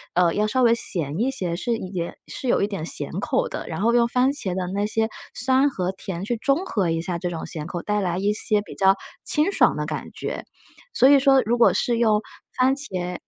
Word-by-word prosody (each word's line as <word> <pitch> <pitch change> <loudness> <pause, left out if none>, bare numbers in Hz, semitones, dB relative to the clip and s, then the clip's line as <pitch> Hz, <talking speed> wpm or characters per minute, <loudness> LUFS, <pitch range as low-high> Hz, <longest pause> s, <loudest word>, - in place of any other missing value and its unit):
呃， 175 -1 +3
要 210 +1 +1
稍 255 +4 +1
微 230 -1 +5
咸 165 -8 -1
一 245 +4 +1
些， 185 -11 -3
是 235 +6 -1
盐 180 -4 -5
是 260 - -6
有 - - +2
一 - - +1
点 195 -6 -5
咸 - - -1
口 - - 0
的， - - -6
然 - - -5
后 230 +2 +3
用 240 -1 +4
番 250 +2 +2
茄 205 -10 -1
的 185 -1 -2
那 200 +1 0
些 220 +1 0 0.3
酸 260 +3 +3
和 185 -8 -2
甜 190 -2 -6
去 240 - -1
中 275 +10 0
和 200 - 0
一 165 0 0
下 175 0 -3
这 180 - -2
种 165 -2 -5
咸 155 -1 -5
口， 175 0 -5
带 210 0 0
来 180 -2 -1
一 200 +2 +1
些 210 0 0
比 205 - -11
较 195 0 +4 0.3
清 305 +6 +1
爽 - - +3
的 - - -2
感 - - -5
觉。 - - -5 0.5
所 265 - +5
以 285 -1 +7
说 270 0 +5
如 235 +3 +1
果 235 - +6
是 240 -1 +1
用 215 -3 +3 0.4
番 260 +1 +3
茄 180 -10 -3
210 Hz, 255 characters per minute, -23 LUFS, 180-255 Hz, 0.5 s, 以